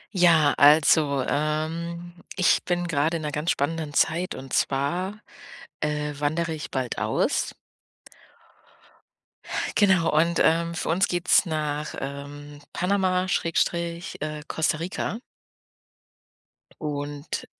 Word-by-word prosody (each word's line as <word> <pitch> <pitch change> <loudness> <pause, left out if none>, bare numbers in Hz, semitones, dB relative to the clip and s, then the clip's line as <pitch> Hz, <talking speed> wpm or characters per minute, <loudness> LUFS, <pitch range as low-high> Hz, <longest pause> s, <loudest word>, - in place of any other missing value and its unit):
Ja, 165 -5 +5
also, 145 -1 +5
ähm, 165 +3 -2 0.2
ich 185 - +3
bin 175 -1 0
gerade 160 +1 +1
in 155 - -7
'ner 150 - -2
ganz 150 +4 -2
spannenden 150 0 -1
Zeit 170 +3 +1
und 135 0 -9
zwar, 175 +9 0 0.6
äh, 150 -1 -2
wandere 160 +3 -1
ich 155 -1 -6
bald 130 -2 -2
aus. - - 0 2.2
Genau 190 -5 +4
und, 170 +2 +3
ähm, 170 +1 +2
für 170 - -3
uns 180 +5 +2
geht's 175 0 +3
nach, 150 -2 -3
ähm, 145 +1 -7
Panama 185 0 +1
Schrägstrich, 170 0 -1
äh, 150 0 -4
Costa 155 -1 0
Rica. 185 +6 -3 1.6
Und 145 -1 -4
160 Hz, 110 wpm, -25 LUFS, 145-170 Hz, 2.2 s, Ja